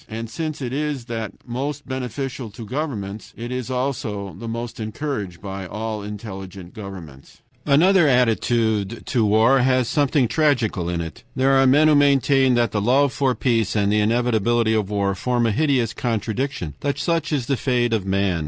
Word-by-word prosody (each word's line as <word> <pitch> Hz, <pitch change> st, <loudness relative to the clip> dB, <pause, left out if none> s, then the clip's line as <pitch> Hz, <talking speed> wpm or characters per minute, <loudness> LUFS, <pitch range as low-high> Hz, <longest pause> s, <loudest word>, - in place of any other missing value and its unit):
And 115 Hz, +1 st, -6 dB
since 155 Hz, +1 st, -4 dB
it 125 Hz, 0 st, -3 dB
is 145 Hz, -3 st, -2 dB
that 115 Hz, -3 st, -4 dB
most 135 Hz, +4 st, -4 dB
beneficial 130 Hz, -1 st, -4 dB
to 110 Hz, +2 st, -9 dB
governments, 110 Hz, -6 st, -5 dB
it 120 Hz, +1 st, -6 dB
is 125 Hz, -1 st, -4 dB
also 115 Hz, -7 st, -3 dB
the 115 Hz, -, -8 dB
most 115 Hz, +1 st, -5 dB
encouraged 110 Hz, -, -4 dB
by 95 Hz, -1 st, -5 dB
all 110 Hz, +1 st, -4 dB
intelligent 95 Hz, -3 st, -8 dB
governments. 90 Hz, -10 st, -10 dB, 0.2 s
Another 170 Hz, +4 st, +5 dB
attitude 115 Hz, -4 st, +1 dB
to 120 Hz, -4 st, +1 dB
war 110 Hz, +6 st, +4 dB
has 130 Hz, -1 st, +2 dB
something 145 Hz, -3 st, +2 dB
tragical 120 Hz, -, +1 dB
in 85 Hz, -1 st, -1 dB
it. 80 Hz, -2 st, -8 dB
There 135 Hz, +1 st, +3 dB
are 135 Hz, 0 st, +5 dB
men 145 Hz, +4 st, +5 dB
who 155 Hz, -, +5 dB
maintain 135 Hz, -2 st, +4 dB
that 120 Hz, -1 st, +2 dB
the 105 Hz, -, -1 dB
love 130 Hz, +5 st, +3 dB
for 135 Hz, -3 st, +1 dB
peace 115 Hz, -5 st, 0 dB
and 100 Hz, -1 st, +2 dB
the 105 Hz, -, +3 dB
inevitability 115 Hz, 0 st, +2 dB
of 105 Hz, -3 st, 0 dB
war 100 Hz, -1 st, 0 dB
form 120 Hz, +4 st, 0 dB
a 115 Hz, -, +2 dB
hideous 125 Hz, -2 st, +1 dB
contradiction, 115 Hz, -, -2 dB
and -, -, -12 dB
that 140 Hz, -1 st, -2 dB
such 165 Hz, 0 st, -1 dB
is 140 Hz, -5 st, 0 dB
the 135 Hz, -, +1 dB
fate 120 Hz, -2 st, 0 dB
of 110 Hz, -4 st, +1 dB
man. 95 Hz, -2 st, 0 dB
120 Hz, 180 wpm, -22 LUFS, 105-135 Hz, 0.2 s, Another